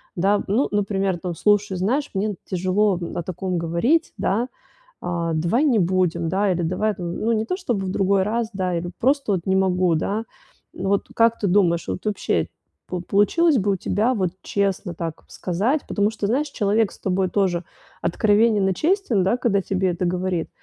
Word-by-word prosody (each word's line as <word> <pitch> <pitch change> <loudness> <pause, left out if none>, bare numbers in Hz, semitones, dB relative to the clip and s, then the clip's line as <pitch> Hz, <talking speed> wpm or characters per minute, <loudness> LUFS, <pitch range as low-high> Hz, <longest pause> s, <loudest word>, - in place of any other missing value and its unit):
да. 195 +4 +2
Ну, 220 +8 +2
например, 195 -2 0
там: 175 -1 -4
"Слушай, 205 +1 +2
знаешь, 255 +11 0
мне 205 +1 -1
тяжело 185 +2 +1 0.2
о - - -1
таком 185 +1 -3
говорить, 170 - +1
да, 230 +5 0 0.5
а, 170 -2 -2
давай 170 - +1
не 260 -6 +3
будем, 175 -2 +1
да, 195 +3 +1
или 175 -1 0
давай, 185 +6 0
там 175 -1 -5
ну, 225 - 0
не 220 -1 +1
то, 365 - -2
чтобы 240 - -2
в - - -2
другой 195 0 +2
раз, 225 +3 -1
да, 185 -2 -1
или 175 +1 -4
просто 270 -3 +2
вот 185 - 0
не 190 - +2
могу, 185 -2 +2
да". 205 +7 -1 0.5
Ну, 190 - -4
вот 200 0 +1
как 230 0 +4
ты 205 - 0
думаешь, 175 -3 +2
вот 185 - -4
вообще 210 -1 0 0.4
пол 180 -1 -4
получилось 270 - +3
бы 205 -2 +1
у - - +1
тебя 220 +7 +1
вот 185 -5 0
честно 195 -2 -1
так 165 -1 -5
сказать? 210 - -1
Потому 205 0 +1
что, 215 -2 -3
знаешь, 270 +8 +1
человек 215 -3 +1
с - - -16
тобой 190 0 0
тоже 180 -2 0 0.4
откровенен 210 +1 +3
и - - +1
честен, 325 - +1
да, 195 +6 +2
когда 205 -5 +1
тебе 190 0 0
это 175 +1 -2
говорит, 180 -1 -1
195 Hz, 190 wpm, -22 LUFS, 180-215 Hz, 0.5 s, как